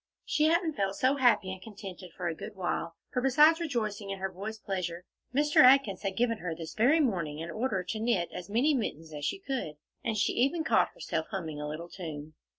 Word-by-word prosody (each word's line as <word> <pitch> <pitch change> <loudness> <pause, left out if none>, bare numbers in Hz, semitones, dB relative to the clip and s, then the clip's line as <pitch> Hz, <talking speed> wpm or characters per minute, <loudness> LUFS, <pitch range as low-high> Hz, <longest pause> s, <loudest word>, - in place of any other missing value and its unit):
She 305 - +2
hadn't 330 0 +2
felt 195 -6 -1
so 260 +6 +2
happy 240 -7 +3
and 190 - -10
contented 195 -4 -9
for 180 - -2
a 170 - -1
good 205 +6 -8
while, 175 -2 -2 0.2
for 250 - +1
besides 300 +5 +5
rejoicing 220 -10 -2
in 195 - -3
her 190 0 -3
boys' 205 +4 -6
pleasure, 180 -4 -4 0.3
Mr. 295 +3 +1
Atkins 255 -7 +6
had 195 -2 -3
given 230 -2 +1
her 170 -2 -3
this 160 -1 -7
very 265 +9 +4
morning 170 - 0
an 165 +1 -5
order 215 -3 -1
to 185 +5 -4
knit 215 -7 +1
as 180 - -7
many 250 +9 +3
mittens 165 - -3
as 145 -1 -4
she - - -1
could, 265 - -4 0.3
and 225 -2 -1
she 210 - +2
even 280 +7 +1
caught - - +3
herself - - -3
humming 160 -7 -4
a 150 - -3
little 155 +3 -5
tune. 155 -4 -7
200 Hz, 215 wpm, -30 LUFS, 175-255 Hz, 0.3 s, Atkins